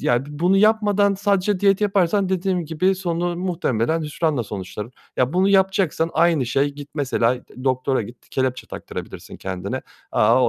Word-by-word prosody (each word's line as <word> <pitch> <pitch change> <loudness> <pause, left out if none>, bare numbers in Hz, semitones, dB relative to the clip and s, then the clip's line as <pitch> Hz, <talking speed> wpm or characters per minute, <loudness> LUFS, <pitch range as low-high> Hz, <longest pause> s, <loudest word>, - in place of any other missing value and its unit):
ya, 120 +3 +1
bi - - -11
bunu 180 +3 +3
yapmadan 205 -1 +3
sadece 200 -1 +1
diyet 195 0 +3
yaparsan 195 -1 +2
dediğim 185 -2 0
gibi 175 +5 +1
sonu 175 -2 -2
muhtemelen 165 -5 0
hüsranla 150 -3 -1
sonuçlanır. 105 +3 -6 0.2
Ya, 125 +4 +1
bunu 190 +2 +3
yapacaksan 190 -4 +2
aynı 160 -6 +3
şey. 135 +4 +1
Git 145 0 -10
mesela 125 -4 +1 0.3
doktora, 130 -1 +1
git, 120 +4 -12
kelepçe 130 -1 -1
taktırabilirsin - - -8
kendine. 95 -1 -4 0.3
Aaa, 115 +3 +4
165 Hz, 150 wpm, -22 LUFS, 130-190 Hz, 0.3 s, Aaa